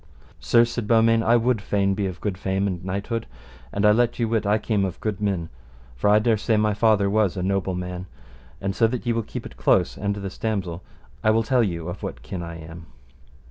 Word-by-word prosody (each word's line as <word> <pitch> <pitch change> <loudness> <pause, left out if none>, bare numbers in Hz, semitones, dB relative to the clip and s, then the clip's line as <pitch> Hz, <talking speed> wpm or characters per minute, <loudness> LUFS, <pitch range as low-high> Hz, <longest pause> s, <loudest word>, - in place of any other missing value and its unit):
Sir, 120 0 +4
said 120 -2 -4
Beaumains, 115 0 +4
I 115 +1 +4
would 120 -2 +2
fain 100 -1 +1
be 100 0 -1
of 90 -1 -6
good 105 -3 -2
fame 95 +1 -1
and 95 -3 -1
of - - -15
knighthood. 100 +4 -3 0.4
And 100 +1 0
I 105 - +7
let 120 +2 +2
you 115 - 0
wit 110 -2 0
I 105 +1 +4
came 105 -2 0
of 95 -2 -3
good 105 -3 -3
men, 95 -5 -1 0.5
for - - +1
I 105 - +6
dare 110 0 +2
say 110 +1 +1
my 105 0 +2
father 105 -1 +3
was 100 -2 +1
a 90 - -2
noble 95 -1 0
man, 90 0 -5 0.5
and 95 0 -2
so 115 - +4
that 125 +1 -4
ye 120 - +1
will 115 - 0
keep - - -7
it - - -8
in - - -18
close, - - +2
and 100 -1 -1
this 100 -2 -7
damosel, 95 -6 -2 0.4
I 110 - +4
will 110 +1 +3
tell 125 +3 +2
you 85 -6 -2
of 90 +2 -6
what - - -6
kin 90 - -5
I 85 -1 -6
am. 80 +1 -10
105 Hz, 240 wpm, -24 LUFS, 95-115 Hz, 0.5 s, I